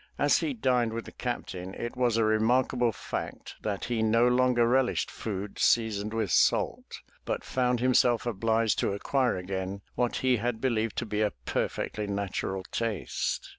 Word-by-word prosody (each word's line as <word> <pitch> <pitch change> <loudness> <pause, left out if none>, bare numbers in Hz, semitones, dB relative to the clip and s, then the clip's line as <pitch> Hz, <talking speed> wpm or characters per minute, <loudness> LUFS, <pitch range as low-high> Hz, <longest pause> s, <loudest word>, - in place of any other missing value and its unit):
As - - +4
he 285 - -2
dined 125 - +1
with 115 0 -4
the - - -9
Captain 95 -6 -5
it 120 - -5
was 120 -3 +2
a 115 - +3
remarkable 120 +3 +2
fact - - -6
that 105 -2 -3
he 120 -2 -1
no 115 +2 +4
longer 125 -1 +3
relished 130 +1 +1
food 100 -2 -5
seasoned 110 -2 +2
with 110 -4 -1
salt, - - +1 0.2
but - - -3
found 125 -2 0
himself 125 -2 +3
obliged 115 0 +1
to - - 0
acquire 125 +3 0
again 95 +1 -4
what 120 -1 0
he 130 -1 +4
had 115 +1 -2
believed 115 -4 0
to 120 - -1
be 105 -1 -2
a 105 -2 +1
perfectly 105 -1 -2
natural 100 -1 -2
taste. 115 -3 -2
115 Hz, 165 wpm, -28 LUFS, 105-125 Hz, 0.2 s, As